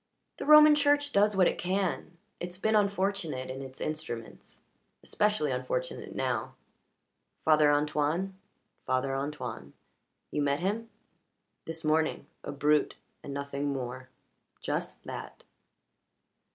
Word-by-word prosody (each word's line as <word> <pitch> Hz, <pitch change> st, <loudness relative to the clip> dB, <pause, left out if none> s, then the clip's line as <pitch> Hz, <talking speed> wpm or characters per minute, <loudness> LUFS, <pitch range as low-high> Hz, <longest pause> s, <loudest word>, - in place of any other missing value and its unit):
"The -, -, -6 dB
Roman 305 Hz, 0 st, +9 dB
Church 290 Hz, 0 st, +3 dB
does 205 Hz, -2 st, +3 dB
what 185 Hz, -2 st, +6 dB
it -, -, -1 dB
can. 185 Hz, -2 st, -1 dB, 0.2 s
It's 180 Hz, 0 st, -5 dB
been 220 Hz, +3 st, +1 dB
unfortunate 195 Hz, -10 st, 0 dB
in 135 Hz, +1 st, -6 dB
its 130 Hz, -1 st, -10 dB
instruments. 155 Hz, -7 st, -6 dB, 0.4 s
Especially 210 Hz, -9 st, +1 dB
unfortunate 125 Hz, 0 st, -3 dB
now." 125 Hz, -4 st, -2 dB, 0.9 s
"Father 155 Hz, -1 st, +5 dB
Antoine?" 150 Hz, +6 st, 0 dB, 0.5 s
"Father 130 Hz, +1 st, +1 dB
Antoine. 125 Hz, -, -5 dB, 0.6 s
You 150 Hz, -, -1 dB
met 140 Hz, 0 st, +1 dB
him?" 210 Hz, +5 st, -2 dB, 0.8 s
"This 160 Hz, 0 st, -6 dB
morning. 155 Hz, +1 st, +1 dB, 0.2 s
A -, -, -5 dB
brute, 150 Hz, +1 st, +2 dB, 0.3 s
and -, -, -7 dB
nothing 140 Hz, 0 st, -3 dB
more." 130 Hz, -1 st, -5 dB, 0.5 s
"Just -, -, -3 dB
that." -, -, -8 dB
150 Hz, 115 wpm, -30 LUFS, 135-195 Hz, 0.9 s, Roman